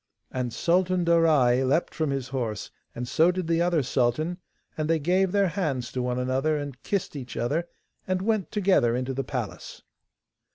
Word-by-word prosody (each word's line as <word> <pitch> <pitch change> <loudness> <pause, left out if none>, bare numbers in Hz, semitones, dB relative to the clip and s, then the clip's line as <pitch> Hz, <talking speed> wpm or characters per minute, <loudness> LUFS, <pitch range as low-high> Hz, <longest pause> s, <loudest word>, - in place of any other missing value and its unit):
And 125 -2 -2
Sultan 180 +4 +1
Darai 155 -7 +4
leapt 140 +6 +1
from 155 -3 -1
his 135 -2 -3
horse, 115 -6 -3 0.2
and 125 +1 -4
so 160 +7 +4
did 180 -1 -1
the 165 +1 +1
other 170 -4 +2
sultan, 135 +8 0 0.4
and 155 0 -2
they 165 - +4
gave 180 +5 +2
their 200 -1 +3
hands 140 -10 -2
to 125 - -2
one 125 0 -1
another 130 +5 0
and 145 -3 -6
kissed 200 -6 -2
each 125 -4 -7
other, 155 +8 -1 0.4
and 185 0 0
went 215 -5 0
together 185 - +3
into 130 +1 -2
the 135 +1 -2
palace. 125 -8 -6
150 Hz, 175 wpm, -26 LUFS, 125-175 Hz, 0.4 s, Darai